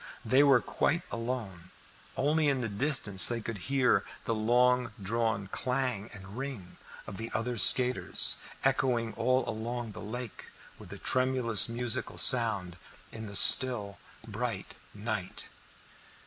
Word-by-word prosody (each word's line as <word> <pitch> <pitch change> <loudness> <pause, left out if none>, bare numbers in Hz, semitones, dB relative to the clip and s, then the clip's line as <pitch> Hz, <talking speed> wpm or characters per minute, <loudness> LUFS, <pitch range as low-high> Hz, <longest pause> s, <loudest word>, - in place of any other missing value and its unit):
They 130 +2 +2
were 135 -4 +3
quite 165 +4 -2
alone, 115 -7 -7 0.5
only 150 +3 0
in 135 -2 -1
the 120 - -3
distance 105 -3 +2
they 120 -1 0
could 115 -2 -8
hear 135 -2 +1 0.2
the 115 - -2
long 120 +2 0
drawn 110 0 -3
clang 125 -5 -4
and 95 0 -12
ring 125 -9 -9 0.3
of 100 - -10
the 115 +1 -7
other 120 +2 -3
skaters, 125 +4 +4 0.3
echoing 125 -4 -1
all 130 +3 -1
along 115 +1 -6
the - - -11
lake 120 +1 -9 0.3
with - - -14
a - - -9
tremulous 130 -4 0
musical 120 0 -3
sound 110 -8 +4 0.3
in 110 -1 -9
the 100 - -9
still 105 -5 +7 0.3
bright - - -6 0.2
night. 100 -3 -6
120 Hz, 135 wpm, -28 LUFS, 105-130 Hz, 0.5 s, still